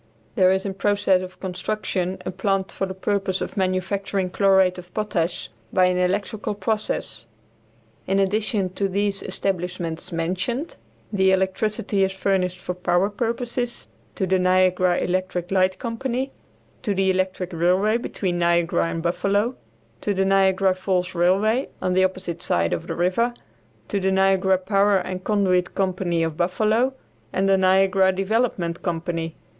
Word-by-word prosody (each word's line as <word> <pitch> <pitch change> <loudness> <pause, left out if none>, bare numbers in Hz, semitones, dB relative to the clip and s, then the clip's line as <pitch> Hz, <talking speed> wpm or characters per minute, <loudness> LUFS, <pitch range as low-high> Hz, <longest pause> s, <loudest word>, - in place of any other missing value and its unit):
There 185 0 +4
is 190 +1 0
in 195 - -2
process 200 -1 +2
of 185 0 -9
construction 185 0 -3
a - - -2
plant 190 +1 -1
for 195 - -2
the 190 - -6
purpose 190 -1 -1
of - - -5
manufacturing 190 0 -1
chlorate 190 -1 +3
of 180 0 -13
potash 185 - -2 0.2
by 185 - +4
an 180 0 +2
electrical 200 +3 -1
process. 200 - -2 0.8
In 195 - +1
addition 200 -1 0
to 195 +1 -1
these 200 +1 -1
establishments 180 -2 -3
mentioned, 185 - -2 0.4
the 190 -1 +4
electricity 195 +1 0
is 190 0 0
furnished 190 -2 0
for 180 - -4
power 180 +2 +1
purposes 235 +2 -3 0.3
to 190 - 0
the 185 0 +2
Niagara 185 -1 +3
Electric 185 0 -2
Light 185 -1 +2
Company; 255 +2 -3 0.5
to 205 -5 -1
the 190 0 +2
electric 185 -1 -2
railway 185 +6 +2
between 185 -6 -3
Niagara 170 -1 +2
and 165 0 -4
Buffalo; 200 +7 0 0.5
to 205 - -1
the 190 +1 +2
Niagara 195 0 +3
Falls 185 -1 -1
Railway, 195 +8 +2
on 185 0 0
the 185 +1 +4
opposite 185 -2 -2
side 85 - +1
of 85 - -4
the - - -3
river; 210 +8 +1 0.5
to 200 - 0
the 190 0 +1
Niagara 190 0 +3
Power 200 +1 +2
and 185 0 -4
Conduit 190 -4 +1
Company 180 -3 0
of 160 -1 -2
Buffalo, 215 +9 +1 0.4
and 190 +1 +1
the 195 - +5
Niagara 190 0 +4
Development 195 -3 -1
Company. 165 -1 -3
190 Hz, 150 wpm, -23 LUFS, 180-200 Hz, 0.8 s, the